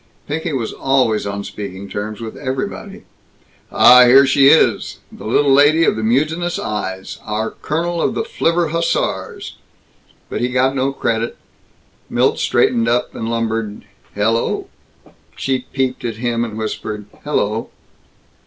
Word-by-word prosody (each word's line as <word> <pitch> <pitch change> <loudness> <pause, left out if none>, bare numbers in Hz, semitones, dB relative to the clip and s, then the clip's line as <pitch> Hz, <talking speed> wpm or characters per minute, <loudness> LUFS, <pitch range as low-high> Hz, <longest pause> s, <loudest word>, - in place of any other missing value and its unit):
Pinky 160 +3 -3
was 125 -6 -3
always 125 -6 +1
on 100 0 -4
speaking 100 -1 -7
terms 105 +2 -5
with 110 -1 -6
everybody. 130 -1 -5 0.7
"Ah, 125 0 +8
here 135 +3 +7
she 135 +1 +5
is! 160 - +3
The - - -9
little 135 +4 +3
lady 145 +4 +5
of - - +3
the 110 - -3
mutinous 155 +10 0
eyes! 95 -3 -4
Our 110 +1 -2
colonel 170 +2 -2
of - - 0
the - - -1
flivver 175 - 0
hussars!" 165 +1 -2 0.7
But - - -4
he 120 - +1
got 130 +1 +1
no 135 +1 0
credit. 115 -3 -2 0.7
Milt - - +1
straightened 115 -1 +2
up 120 +1 0
and 115 - -4
lumbered, 115 -2 -2 0.3
"Hel 105 +2 +2
lo!" 115 - -2 0.7
She 130 -1 -2
peeped 130 -1 -1
at 115 -2 -3
him 120 0 -1
and 110 -2 -5
whispered, 110 -1 -4 0.2
"Hel 150 - -3
lo!" 110 +2 -1
125 Hz, 145 wpm, -18 LUFS, 110-140 Hz, 0.7 s, Ah